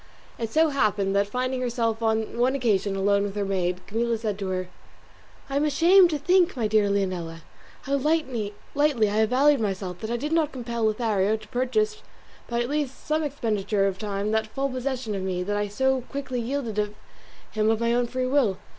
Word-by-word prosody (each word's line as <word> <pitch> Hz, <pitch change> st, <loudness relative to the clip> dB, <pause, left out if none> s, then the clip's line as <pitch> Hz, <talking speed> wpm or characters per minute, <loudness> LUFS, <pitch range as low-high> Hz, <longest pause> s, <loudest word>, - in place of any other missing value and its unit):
It 230 Hz, -2 st, -2 dB
so 320 Hz, +3 st, +4 dB
happened 205 Hz, -8 st, +1 dB
that 200 Hz, 0 st, +2 dB
finding 255 Hz, +3 st, -2 dB
herself 230 Hz, -2 st, -1 dB
on 220 Hz, 0 st, 0 dB
one 255 Hz, +2 st, +3 dB
occasion 205 Hz, -6 st, +1 dB
alone 200 Hz, +1 st, +2 dB
with 200 Hz, 0 st, -3 dB
her 205 Hz, -1 st, -1 dB
maid, 180 Hz, -2 st, -1 dB
Camilla 230 Hz, +2 st, -1 dB
said 215 Hz, -3 st, -3 dB
to 195 Hz, -, -3 dB
her, 185 Hz, -1 st, -2 dB, 0.8 s
"I 275 Hz, -, -2 dB
am 285 Hz, -, +2 dB
ashamed 345 Hz, +5 st, +5 dB
to 305 Hz, -, -1 dB
think, 355 Hz, +2 st, +3 dB
my 230 Hz, -, 0 dB
dear 210 Hz, -1 st, +3 dB
Leonela, 180 Hz, -5 st, -2 dB, 0.4 s
how 280 Hz, +1 st, 0 dB
lightly 265 Hz, -8 st, -1 dB, 0.2 s
I 290 Hz, +1 st, +4 dB, 0.3 s
have 220 Hz, 0 st, +3 dB
valued 280 Hz, +3 st, +4 dB
myself 190 Hz, -3 st, -3 dB
that 220 Hz, -, -5 dB
I 240 Hz, -, 0 dB
did 295 Hz, +6 st, -4 dB
not 320 Hz, -2 st, +2 dB
compel 235 Hz, -3 st, -3 dB
Lothario 215 Hz, -2 st, +1 dB
to 215 Hz, -1 st, -14 dB
purchase 225 Hz, -4 st, 0 dB, 0.5 s
by 235 Hz, 0 st, 0 dB
at 240 Hz, -, -5 dB
least 290 Hz, -3 st, -3 dB
some 310 Hz, +1 st, +1 dB
expenditure 215 Hz, -8 st, 0 dB
of 195 Hz, -1 st, -1 dB
time 205 Hz, 0 st, -2 dB
that 220 Hz, 0 st, +1 dB
full 275 Hz, +5 st, -2 dB
possession 255 Hz, -3 st, -3 dB
of 195 Hz, -, -3 dB
me 185 Hz, -1 st, -2 dB
that 205 Hz, +2 st, -2 dB
I 205 Hz, 0 st, 0 dB
so 265 Hz, +5 st, +1 dB
quickly 270 Hz, -3 st, -3 dB
yielded 235 Hz, -3 st, -2 dB, 0.7 s
him 215 Hz, 0 st, +1 dB
of 225 Hz, -1 st, +2 dB
my 235 Hz, 0 st, +1 dB
own 245 Hz, 0 st, +1 dB
free 255 Hz, +1 st, -2 dB
will. 255 Hz, -8 st, +2 dB
225 Hz, 200 wpm, -25 LUFS, 205-265 Hz, 0.8 s, ashamed